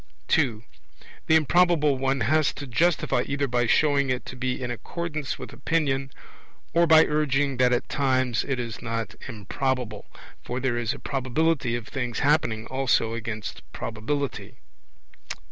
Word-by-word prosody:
(2) 120 Hz, -8 st, +2 dB, 0.6 s
The 160 Hz, -, +5 dB
Improbable 160 Hz, -1 st, +4 dB
one 135 Hz, 0 st, 0 dB
has 155 Hz, +6 st, +2 dB
to 145 Hz, -, -6 dB
justify 160 Hz, +7 st, +1 dB
either 140 Hz, 0 st, 0 dB
by 120 Hz, -1 st, +1 dB
showing 140 Hz, +1 st, +3 dB
it 125 Hz, -1 st, -1 dB
to -, -, -7 dB
be 130 Hz, 0 st, -2 dB
in 125 Hz, -2 st, -3 dB
accordance 155 Hz, +3 st, -4 dB
with -, -, -9 dB
opinion, 135 Hz, -2 st, 0 dB, 0.6 s
or 170 Hz, +1 st, +4 dB
by 160 Hz, 0 st, +7 dB
urging 145 Hz, -3 st, +1 dB
that 125 Hz, 0 st, +4 dB
at 125 Hz, -, 0 dB
times 130 Hz, -4 st, +1 dB
it 135 Hz, -2 st, -2 dB
is 115 Hz, -2 st, -5 dB
not 115 Hz, -4 st, -3 dB
improbable; 115 Hz, +1 st, -3 dB, 0.4 s
for 125 Hz, -, -3 dB
there 130 Hz, -2 st, 0 dB
is 115 Hz, -2 st, -1 dB
a -, -, -9 dB
probability 135 Hz, 0 st, 0 dB
of 120 Hz, -2 st, -5 dB
things 125 Hz, -3 st, -3 dB
happening 135 Hz, -7 st, +2 dB
also 125 Hz, -4 st, +1 dB
against 110 Hz, -2 st, -5 dB
probability. 125 Hz, +6 st, -4 dB
130 Hz, 145 wpm, -25 LUFS, 120-145 Hz, 0.6 s, by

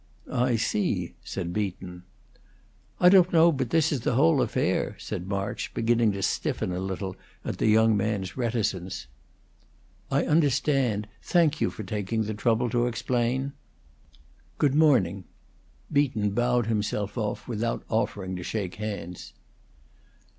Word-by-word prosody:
"I 125 Hz, 0 st, +2 dB
see," 115 Hz, -, -1 dB
said 90 Hz, -2 st, -4 dB
Beaton. 90 Hz, -3 st, -4 dB, 1.0 s
"I 180 Hz, -, +6 dB
don't 185 Hz, -1 st, +6 dB
know 170 Hz, 0 st, +6 dB
but 140 Hz, -, -2 dB
this 160 Hz, -2 st, +2 dB
is 145 Hz, -, 0 dB
the 120 Hz, -, 0 dB
whole 150 Hz, +1 st, +4 dB
affair," -, -, 0 dB
said 90 Hz, -, -5 dB
March, 100 Hz, 0 st, -3 dB
beginning 115 Hz, -1 st, +2 dB
to 100 Hz, -1 st, -4 dB
stiffen 90 Hz, -, -1 dB
a 90 Hz, -, -2 dB
little 95 Hz, 0 st, -4 dB, 0.3 s
at -, -, -4 dB
the -, -, +2 dB
young 110 Hz, 0 st, +5 dB
man's 100 Hz, -3 st, -1 dB
reticence. 105 Hz, -, -2 dB, 1.0 s
"I -, -, +1 dB
understand. 135 Hz, -7 st, +2 dB
Thank 160 Hz, -4 st, +2 dB
you -, -, +2 dB
for 100 Hz, +4 st, -7 dB
taking 105 Hz, +2 st, -2 dB
the 110 Hz, +1 st, -3 dB
trouble 115 Hz, +2 st, +1 dB
to 120 Hz, -1 st, +2 dB
explain. 125 Hz, +3 st, -1 dB, 1.0 s
Good 145 Hz, -3 st, +2 dB
morning." 120 Hz, -, +3 dB, 0.7 s
Beaton 130 Hz, -8 st, +2 dB
bowed 120 Hz, +2 st, +1 dB
himself 105 Hz, -2 st, -1 dB
off, 105 Hz, -4 st, -3 dB
without 115 Hz, -1 st, -2 dB
offering 100 Hz, -4 st, -1 dB
to 90 Hz, -, -6 dB
shake 95 Hz, -2 st, -4 dB
hands. 100 Hz, -5 st, -6 dB
110 Hz, 135 wpm, -27 LUFS, 100-130 Hz, 1.0 s, I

